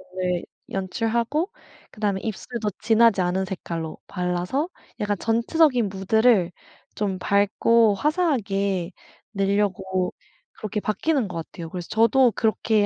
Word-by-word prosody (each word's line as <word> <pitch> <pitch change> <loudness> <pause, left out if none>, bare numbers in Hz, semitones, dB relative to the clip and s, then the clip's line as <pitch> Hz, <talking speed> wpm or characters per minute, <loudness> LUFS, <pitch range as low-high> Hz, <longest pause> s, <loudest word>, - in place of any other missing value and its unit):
눈을 180 -1 -1 0.3
연출하고 230 - -1 0.4
그 - - -16
다음에 200 -3 0
입술도 220 0 -3
진하지 225 -3 +4
않은 180 +2 0
색깔로 165 -4 -5
발라서 180 - -1 0.3
약간 205 -1 0
전체적인 235 0 +2
무드를 195 -1 +3 0.4
좀 195 -3 -1
밝고 205 +3 +3
화사하게 200 - 0 0.4
내려고 195 -2 0 0.4
그렇게 210 0 -3
바뀌는 240 +3 0
것 175 - -6
같아요. 165 0 -7
그래서 175 0 -6
저도 235 +3 +4
그렇게 220 -1 +2
205 Hz, 285 characters per minute, -24 LUFS, 190-230 Hz, 0.4 s, 진하지